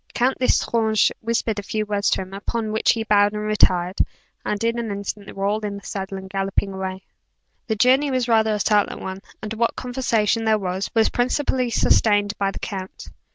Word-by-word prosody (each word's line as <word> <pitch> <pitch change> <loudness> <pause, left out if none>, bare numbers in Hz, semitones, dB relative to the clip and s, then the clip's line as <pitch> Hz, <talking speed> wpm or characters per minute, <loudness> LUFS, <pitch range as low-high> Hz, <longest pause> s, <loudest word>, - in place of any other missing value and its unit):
Count 255 +2 +1
L'Estrange 220 -4 +2
whispered 225 -2 -1
a - - -3
few 215 +2 -2
words 205 -1 0
to - - +1
him, 190 0 -9
upon 215 +2 -3
which 220 - +3
he 225 - -2
bowed 205 -1 +3
and 210 0 -3
retired; 185 -3 +2 0.4
and 210 +1 -2
in 230 +1 +1
an 230 -2 -3
instant 200 0 -5
they - - -8
were 195 0 -3
all 210 +2 +1
in 205 -2 -4
the 200 - -12
saddle, 195 -1 -5
and 190 0 -8
galloping 195 0 -1
away. 190 0 -5 0.6
The 220 - 0
journey 260 +6 +4
was 255 -2 0
rather 220 -2 +3
a - - -3
silent 205 0 +2
one, 190 0 -6 0.2
and 215 0 -4
what 230 +1 0
conversation 235 -4 0
there 220 -1 +3
was, 190 -1 -3
was 225 -1 +4
principally 255 0 0
sustained 205 -3 +3
by 200 -1 +1
the - - -7
count. 190 -2 -6
210 Hz, 200 wpm, -22 LUFS, 195-230 Hz, 0.6 s, journey